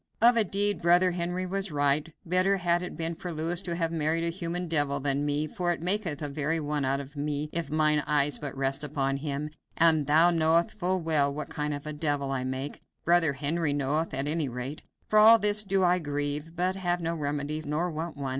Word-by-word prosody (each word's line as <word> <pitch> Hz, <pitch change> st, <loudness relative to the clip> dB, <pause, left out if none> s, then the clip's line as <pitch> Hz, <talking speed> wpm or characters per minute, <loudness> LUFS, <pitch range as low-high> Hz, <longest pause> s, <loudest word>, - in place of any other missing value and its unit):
Of 235 Hz, +2 st, +6 dB
a 230 Hz, -, +5 dB
deed, 205 Hz, +1 st, 0 dB
brother 175 Hz, +2 st, +4 dB
Henry 175 Hz, +1 st, -2 dB
was 195 Hz, 0 st, -2 dB
right; 145 Hz, +2 st, +1 dB
better 185 Hz, +3 st, +2 dB
had 175 Hz, -1 st, +1 dB
it 180 Hz, -, -6 dB
been 165 Hz, +1 st, -2 dB
for 175 Hz, +2 st, -6 dB
Louis 165 Hz, +3 st, 0 dB
to 175 Hz, -3 st, -4 dB
have 165 Hz, -1 st, -1 dB
married 160 Hz, +1 st, 0 dB
a 170 Hz, -, 0 dB
human 175 Hz, 0 st, -4 dB
devil 145 Hz, -3 st, +1 dB
than 140 Hz, +1 st, -1 dB
me, 145 Hz, +1 st, 0 dB
for 175 Hz, +3 st, -2 dB
it 170 Hz, -, -2 dB
maketh 175 Hz, -4 st, -1 dB
a -, -, -1 dB
very 150 Hz, +3 st, -1 dB
one 150 Hz, -1 st, -2 dB
out 135 Hz, +1 st, 0 dB
of 140 Hz, +1 st, -9 dB
me 145 Hz, +1 st, -3 dB
if 165 Hz, -3 st, -2 dB
mine 155 Hz, 0 st, +3 dB
eyes 145 Hz, -1 st, +2 dB
but 140 Hz, -2 st, -6 dB
rest 135 Hz, +1 st, -1 dB
upon 135 Hz, -2 st, -1 dB
him, 145 Hz, +1 st, -4 dB, 0.3 s
and 160 Hz, -3 st, +4 dB
thou 160 Hz, +4 st, +5 dB
knowest 165 Hz, 0 st, +2 dB
full 185 Hz, -2 st, -1 dB
well 150 Hz, -3 st, +2 dB
what 145 Hz, +1 st, -5 dB
kind 150 Hz, -1 st, -3 dB
of 145 Hz, 0 st, -5 dB
a 150 Hz, -, -4 dB
devil 145 Hz, -2 st, -1 dB
I 130 Hz, -1 st, -2 dB
make 130 Hz, +2 st, -5 dB, 0.2 s
brother 170 Hz, -3 st, +4 dB
Henry 150 Hz, +2 st, -1 dB
knoweth, 145 Hz, +3 st, -1 dB
at 135 Hz, +2 st, -2 dB
any 155 Hz, -2 st, -1 dB
rate. 125 Hz, +4 st, -6 dB, 0.3 s
For 215 Hz, -, +4 dB
all 225 Hz, +2 st, +9 dB
this 210 Hz, -1 st, +2 dB
do 195 Hz, -1 st, +1 dB
I 180 Hz, 0 st, +3 dB
grieve, 145 Hz, +1 st, -3 dB
but 180 Hz, +2 st, 0 dB
have 175 Hz, -2 st, -1 dB
no 165 Hz, -1 st, -2 dB
remedy, 150 Hz, 0 st, -3 dB
nor 160 Hz, +4 st, -1 dB
want 160 Hz, 0 st, -5 dB
one. 140 Hz, -2 st, -3 dB
155 Hz, 220 wpm, -28 LUFS, 145-175 Hz, 0.3 s, all